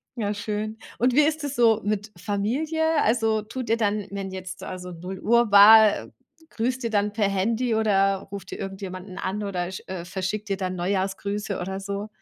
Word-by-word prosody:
Ja, 210 -4 -1
schön. 210 +1 -4 0.2
Und 250 +1 +3
wie 295 - +6
ist 310 +1 +1
es 285 -1 -4
so 230 -3 +4
mit 210 0 -2
Familie? 295 - 0
Also, 225 -1 +2
tut 235 +3 -6
ihr 225 - +3
dann, 210 -2 0
wenn 195 -1 -5
jetzt 185 0 -7
also 180 -1 -7
0:00 180 +2 -7
Uhr 235 -1 +3
war 210 +1 +8 0.4
grüßt 250 +3 -2
ihr 230 - -1
dann 205 -1 0
per 210 -1 +1
Handy 225 +5 0
oder 195 -3 +2
ruft 200 -2 -7
ihr - - -6
irgendjemanden 190 -1 -7
an 205 +3 -3
oder 180 -3 -3
sch 190 - -7
äh, 185 -2 -5
verschickt 190 +4 -4
ihr 195 - 0
dann 185 -1 -3
Neujahrsgrüße 195 +2 -2
oder 190 +2 -4
so? 200 +1 -4
205 Hz, 185 wpm, -25 LUFS, 190-225 Hz, 0.4 s, war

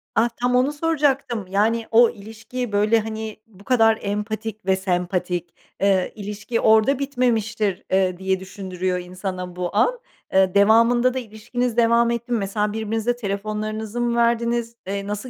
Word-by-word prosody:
Ah, 230 +2 +3
tam 250 0 +2
onu 255 +3 +3
soracaktım. 280 -8 0
Yani 220 +4 +1
o 230 +1 +6
ilişki 225 +3 -7
böyle, 210 +3 +3
hani, 220 0 -5
bu 200 -3 -18
kadar 225 -2 +4
empatik 210 +1 -4
ve 190 0 +3
sempatik, 180 -2 -2 0.3
eee, 195 -2 +2
ilişki 210 +3 -4
orada 220 +5 +4
bitmemiştir, 225 -7 0
eee, 185 -1 +2
diye 190 0 -1
düşündürüyor 185 -1 -3
insana 180 0 -6
bu 180 +1 -4
an. 485 - +2 0.3
Eee, 190 -1 +4
devamında 230 +4 +5
da, 260 - -2
eee, 250 - -8
ilişkiniz 230 +3 -3
devam 235 0 +4
etti 235 +1 -4
mi, 240 - +2
mesela 210 +1 -1
birbirinize 220 +2 -1
telefonlarınızı 215 +1 -3
mı 240 0 0
verdiniz? 235 0 +1
Eee, 200 0 -3
nasıl, 210 +5 -4
220 Hz, 155 wpm, -22 LUFS, 195-235 Hz, 0.3 s, o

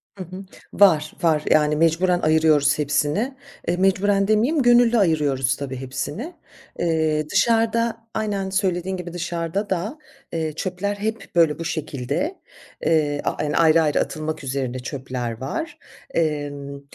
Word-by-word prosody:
Hı 190 - -6
hı. 185 +3 -9 0.3
Var, 160 -7 +4
var. 155 -3 +3
Yani, 150 0 +4
mecburen 170 +3 +2
ayırıyoruz 155 -2 +3
hepsini. 150 - 0 0.3
Eee, 175 +1 +1
mecburen 195 +1 +2
demeyeyim 240 +9 +2
gönüllü 240 -1 +5
ayırıyoruz 145 - +2
tabii, 135 -2 -5
hepsini. 145 - -5 0.5
Eee, 160 -2 0
dışarıda 230 +1 +1
aynen, 200 -3 -2
söylediğin 190 -1 -1
gibi, 175 -1 -7
dışarıda 175 +3 -3
da, 195 - -2 0.4
eee, 160 -2 -2
çöpler 185 +4 -3
hep 220 +2 -4
böyle 165 -2 +3
bu 165 - -4
şekilde. 160 - -3 0.4
Eee, 150 -3 +2 0.2
yani, 150 -1 -1
ayrı 165 0 +5
ayrı 150 -2 +1
atılmak 155 0 -3
üzerine 130 -2 -3
çöpler 125 -2 -4
var. 320 - -4 0.4
Emm, 145 -3 -2
165 Hz, 130 wpm, -22 LUFS, 150-200 Hz, 0.5 s, gönüllü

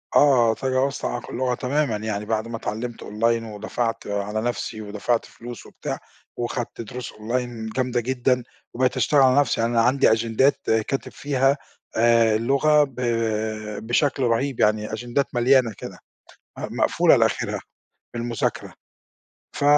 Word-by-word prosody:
آه، 125 -6 +5
تجاوزت 130 +2 -1
عائق 120 - -3
اللغة 125 0 -1
تمامًا. 135 -1 0
يعني 105 -1 -3
بعد 110 +1 -1
ما 115 -1 -4
اتعلّمت 115 +2 -5
أونلاين، 115 +2 0
ودفعت 115 +2 -3
على 100 +1 -2
نفسي 120 -2 -3
ودفعت 105 +3 -1
فلوس 120 -4 -10
وبتاع، - - -5 0.4
وخدت 120 0 -3
دروس 120 +2 -7
أونلاين 115 0 -3
جامدة 125 +1 0
جدًا، 125 +1 0 0.3
وبقيت 130 +1 +1
أشتغل 150 - +3
على 130 +1 +5
نفسي. 140 -5 +1
يعني 115 +1 0
أنا 115 - +4
عندي 125 +2 +4
أجندات 115 +5 +2
كاتب 110 +5 -1
فيها 135 0 +1 0.4
آآ 115 -1 +4
اللغة 140 +6 +3
ب 135 -3 -6 0.9
بشكل 135 +2 +1
رهيب 125 +2 0
يعني، 105 0 +2
أجندات 120 +4 -2
مليانة 125 -1 +4
كده، - - -9 0.6
آآ - - -4
مقفولة - - +4
لآخرها - - +1 0.5
بالمذاكرة. 120 -2 -2 0.8
ف - - -2
120 Hz, 135 wpm, -23 LUFS, 110-130 Hz, 0.9 s, آه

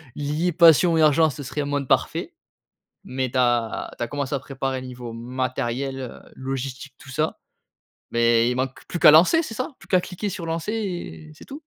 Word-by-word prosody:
lier 150 +5 -1
passion 165 0 +6
et - - +3
argent 155 +1 +5
ce 145 +1 -7
serait 150 +3 -3
un - - -2
monde 145 -2 -2
parfait. - - 0 0.7
Mais 130 -1 -3
tu 130 - -1
as 120 -2 +1
tu - - -6
as - - -7
commencé 145 0 -3
à - - +1
préparer 135 -1 -4
niveau 125 -2 -8
matériel 130 +2 -3
heu, 130 -2 -7 0.2
logistique 135 0 -5
tout 140 -4 -13
ça, 155 +4 -1 0.7
mais 115 0 +3
il 125 - -1
manque 130 0 -3
plus 175 - -4
qu'à 155 -2 +9
lancer 185 - +6
c'est 225 - -6
ça, 255 +6 -4
plus - - -16
qu'à 185 -2 +4
cliquer 190 +3 -5
sur 175 -3 -6
lancer, 165 +5 -3
et 175 - -5
c'est - - -15
tout? 285 +3 -9
135 Hz, 200 wpm, -23 LUFS, 125-165 Hz, 0.7 s, qu'à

